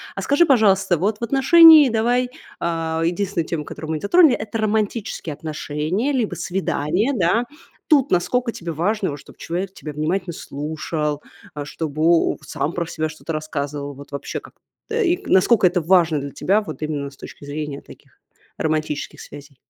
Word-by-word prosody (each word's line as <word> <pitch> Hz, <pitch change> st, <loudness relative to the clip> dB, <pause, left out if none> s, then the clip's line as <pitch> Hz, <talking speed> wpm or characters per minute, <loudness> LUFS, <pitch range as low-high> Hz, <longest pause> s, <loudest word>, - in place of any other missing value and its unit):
А -, -, -4 dB
скажи, 290 Hz, +5 st, +3 dB
пожалуйста, 195 Hz, -, +3 dB
вот 205 Hz, +6 st, -1 dB
в -, -, -7 dB
отношении, 295 Hz, +4 st, +8 dB
давай, 240 Hz, +2 st, +1 dB, 0.3 s
э, -, -, -3 dB, 0.4 s
единственная 175 Hz, 0 st, -1 dB
тема, 155 Hz, -3 st, -4 dB
которую 160 Hz, 0 st, -7 dB
мы 160 Hz, -, -1 dB
не -, -, -9 dB
затронули- 310 Hz, -, +5 dB
это 215 Hz, +1 st, -4 dB
романтические 215 Hz, -5 st, -2 dB
отношения 155 Hz, -, -3 dB
либо 245 Hz, -6 st, -1 dB
свидания, 190 Hz, -, -1 dB
да. 210 Hz, +4 st, +2 dB, 0.4 s
Тут 285 Hz, -4 st, +3 dB
насколько 240 Hz, +7 st, +1 dB
тебе 170 Hz, -6 st, -6 dB
важно, 190 Hz, +2 st, -1 dB
вот 145 Hz, -, -7 dB
чтоб -, -, -16 dB
человек 185 Hz, +3 st, -4 dB
тебя 150 Hz, -5 st, -8 dB
внимательно 170 Hz, +4 st, -2 dB
слушал, 150 Hz, 0 st, -4 dB, 0.3 s
а, 150 Hz, -, -5 dB
чтобы 155 Hz, +1 st, -4 dB
он 170 Hz, 0 st, +3 dB
сам 155 Hz, +1 st, -3 dB
про 170 Hz, -1 st, -2 dB
себя 155 Hz, -1 st, -3 dB
что-то 155 Hz, +1 st, -8 dB
рассказывал? 145 Hz, -2 st, -4 dB
Вот 140 Hz, +1 st, -13 dB
вообще, 140 Hz, 0 st, -5 dB
как -, -, -16 dB, 0.4 s
и 405 Hz, -7 st, +1 dB
насколько 195 Hz, +1 st, +4 dB
это 180 Hz, 0 st, +1 dB
важно 165 Hz, -2 st, +3 dB
для 140 Hz, 0 st, -6 dB
тебя 205 Hz, +9 st, +1 dB
вот 205 Hz, -, -8 dB
именно 150 Hz, -2 st, -3 dB
с 140 Hz, -, -18 dB
точки -, -, -11 dB
зрения 145 Hz, -1 st, -5 dB
таких -, -, -18 dB, 0.4 s
романтических 155 Hz, -2 st, -2 dB
связей? 140 Hz, -1 st, -12 dB
175 Hz, 170 wpm, -21 LUFS, 150-220 Hz, 0.4 s, отношении